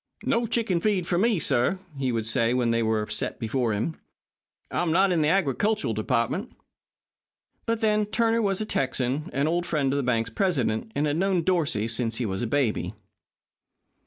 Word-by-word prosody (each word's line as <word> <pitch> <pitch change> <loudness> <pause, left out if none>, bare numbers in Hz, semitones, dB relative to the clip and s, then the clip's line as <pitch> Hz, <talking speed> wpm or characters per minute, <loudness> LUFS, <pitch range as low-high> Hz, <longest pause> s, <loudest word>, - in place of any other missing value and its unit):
"No 230 0 +1
chicken 220 -6 0
feed 195 -2 +1
for 175 0 +1
me," 220 -2 +2 0.6
he 135 -2 -1
would 115 -2 -1
say 115 +1 +1
when 120 -2 +1
they 115 0 +1
were 110 -1 0
set 105 - -2
before 120 +1 -1
him. 110 +10 -2 0.7
"I'm 175 -2 0
not 190 +3 +4
in 170 -3 +2
the 150 - +2
agricultural 195 - +1
department." - - -1 1.1
But, 230 -1 0
then, 210 -1 +2
Turner 230 +1 +1
was 195 -3 0
a 215 - -1
Texan, 135 - -1
an 140 +2 0
old 175 +2 0
friend 145 -5 0
of - - 0
the - - +1
bank's 115 -3 0
president, 120 - 0
and 145 - +1
had 150 +1 0
known 185 -1 +1
Dorsey 155 - +1
since 115 0 -2
he 120 - -2
was 95 -2 -2
a 120 - -1
baby. 125 -2 0
150 Hz, 180 wpm, -26 LUFS, 115-195 Hz, 1.1 s, not